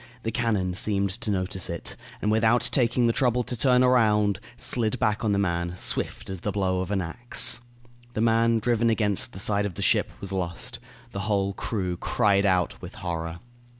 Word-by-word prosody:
The 115 - -2
cannon 105 -7 0
seemed 100 0 +1
to 110 +2 -5
notice 95 -2 -1
it, 85 - -3 0.3
and 105 - +2
without 110 +2 +3
taking 120 -1 +2
the 115 - +3
trouble 125 -1 +2
to 125 - -4
turn 125 +1 +4
around, 105 -5 +3 0.2
slid 120 -1 +1
back 105 -2 0
on 110 - +1
the 100 - +2
man, 85 -2 -1
swift - - -2
as 95 -1 -5
the 105 - -2
blow 95 -2 0
of 95 - -4
an 100 -2 0
axe. 120 +7 0 0.5
The 110 - -1
man, 115 0 +3
driven 115 +1 +1
against 105 -3 +1
the 95 - -10
side 100 +1 +1
of 90 - -9
the - - -3
ship, - - +2
was 100 - -6
lost. 90 -3 -2 0.3
The 100 - -5
whole 100 -1 +1
crew 95 -4 -3
cried 100 +1 +2
out 90 -3 +1
with - - -9
horror. 85 -1 -4
105 Hz, 190 wpm, -26 LUFS, 95-115 Hz, 0.5 s, turn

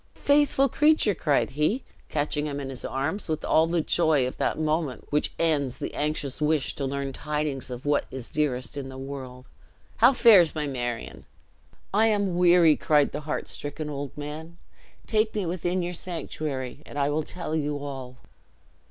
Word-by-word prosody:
"Faithful 285 -1 +3
creature!" 300 -5 +3
cried 150 -6 +1
he, 155 - 0 0.3
catching 150 0 -1
him 145 -1 -3
in 135 -1 -5
his 130 - -7
arms, 145 +10 -2
which 155 -1 -2
all 160 +1 +3
the 170 0 +1
joy 155 -4 +2
of 125 - -4
that - - 0
moment 155 -3 -1
which 150 0 +1
ends 145 -6 +1
the - - -5
anxious 145 -2 -2
wish 150 -2 +1
to 140 - -3
learn 140 0 -3
tidings 150 -2 -3
of 125 +2 -7
what 145 0 +2
is 130 -2 -7
dearest 135 -4 -1
in 135 -2 -5
the 130 - -9
world, 130 -2 -8 0.5
"how 240 +4 +7
fares 210 - +6
my 150 -1 -1
Marion?" 120 -4 -4 0.7
"I 220 +2 +4
am 205 -4 +1
weary," 175 -3 +6
cried 150 -1 +3
the - - -4
heart - - -2
stricken 150 +1 -6
old 140 -1 -6
man; 155 +3 -7 0.5
"take 220 0 +1
me 205 -3 -1
within 175 +1 -1
your 175 +1 -3
sanctuary, 155 -7 -5
and 145 - -10
I 140 0 +1
will 155 +2 +1
tell 155 0 -5
you 150 -2 -1
all." 135 -3 -7
150 Hz, 175 wpm, -26 LUFS, 140-170 Hz, 0.7 s, how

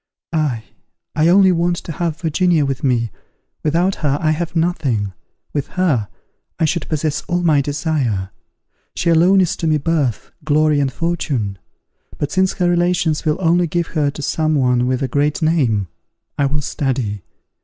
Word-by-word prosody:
_ - - -63 0.3
Ah! 145 -8 0 0.5
I 155 +1 +3
only 190 +2 +6
want 175 0 +1
to 170 - -7
have 165 0 -2
Virginia 165 -1 +2
with 135 -2 -3
me: 120 -5 +1 0.5
without 170 +5 +1
her 145 -2 +1
I 155 -2 +1
have 170 +2 -3
nothing, 135 - 0 0.4
with 145 -2 -2
her, 145 - +2 0.5
I 160 - +2
should 160 0 -2
possess 155 -1 -1
all 175 0 0
my 155 -4 +4
desire. 135 - -1 0.6
She 170 - +1
alone 180 +4 +5
is 180 - +1
to 165 - -2
me 155 -1 +3
birth, 145 -6 -1
glory, 150 0 +3
and 140 -2 +1
fortune. 135 - -2 0.6
But, 145 - -3
since 190 +1 +2
her 180 - 0
relations 175 -2 +1
will 155 +1 +1
only 175 0 +2
give 170 +1 -2
her 150 -3 +1
to 150 +1 -7
some 155 +2 0
one 125 -3 +2
with 130 +1 0
a - - 0
great 145 +3 0
name, 125 - +2 0.5
I 140 -2 +1
will 145 +1 -1
study. 125 -8 -2
155 Hz, 170 wpm, -19 LUFS, 135-170 Hz, 0.6 s, only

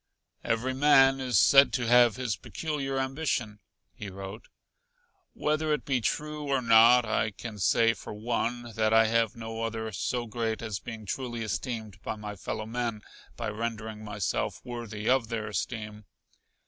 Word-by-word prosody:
"Every 120 +3 0
man 135 -1 +5
is 125 -5 +1
said 140 +7 +7
to 125 -3 0
have 120 -1 +5
his 125 -4 -2
peculiar 140 -4 -4
ambition," 130 -6 -2 0.3
he 105 - -7
wrote. 95 +3 -8 0.9
"Whether 155 +1 0
it 150 - -2
be 130 -3 0
true 150 +4 -2
or 135 -1 +2
not, 115 +1 +6
I 110 0 0
can 105 +1 -8
say, 115 +4 +4
for 100 - -9
one, 120 +2 -2
that 110 0 +2
I 110 0 +6
have 115 -1 +1
no 115 -1 -6
other 110 -1 -3
so 120 +5 -2
great 115 0 -3
as 110 -4 -3
being 110 -1 -8
truly 120 +2 -4
esteemed 110 0 -4
by - - -4
my 105 -1 -7
fellow 105 +2 -5
men 115 -2 -3 0.3
by - - -3
rendering 110 0 -5
myself 105 -4 -2
worthy 115 -3 -6
of 130 -2 +3
their 110 -2 -3
esteem. 105 +1 -4
115 Hz, 160 wpm, -28 LUFS, 110-125 Hz, 0.9 s, said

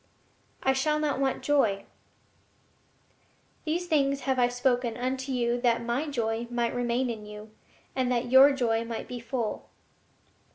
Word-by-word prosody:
I 265 - +3
shall 300 +3 +1
not 300 -3 -1
want 270 -1 0
joy. 225 -9 +2 1.8
"These 335 +3 -1
things 280 -4 +1
have 260 0 0
I 245 - +5
spoken 245 -1 0
unto 260 +2 -3
you 240 -1 0
that 235 -1 +2
My 240 +6 -1
joy 230 -4 -2
might 240 -1 -1
remain 245 +1 0
in 215 -2 -8
you, 210 +1 -10 0.4
and 255 -1 0
that 245 0 -1
your 265 +2 +8
joy 230 -4 0
might 230 -1 -5
be 245 - -6
full." 235 -1 -4
245 Hz, 150 wpm, -28 LUFS, 235-270 Hz, 1.8 s, your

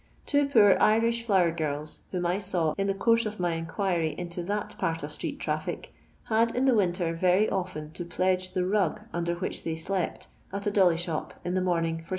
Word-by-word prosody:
Two 285 -1 +2
poor 215 -8 +6
Irish 230 +2 +3
flower 190 -7 +3
girls, 150 -2 -4
whom 180 -2 -2
I 180 +3 +1
saw 175 -6 0
in 195 0 -1
the 195 - 0
course 230 +2 +3
of 215 -1 -7
my 175 -1 +1
inquiry 165 0 -1
into 175 0 -5
that 205 +2 -3
part 165 0 -1
of - - -5
street - - -4
tntfHc, - - -3 0.3
had 230 +1 +1
in 255 +2 +2
the 265 - +5
winter 175 -5 +1
very 185 +5 +3
often 175 -5 -3
to 175 - -6
pledge 185 +1 0
the 180 -1 0
rug 200 0 +1
nnder 170 0 -1
which - - -3
they 165 - -2
slept 180 +3 -3 0.2
at 200 +2 -4
a 205 - +1
dolly 185 -5 +4
shop 165 -2 -3
in 175 - -1
the 185 - +1
morning 165 -2 0
for 165 - -14
6 - - -20
185 Hz, 210 wpm, -28 LUFS, 170-205 Hz, 0.3 s, poor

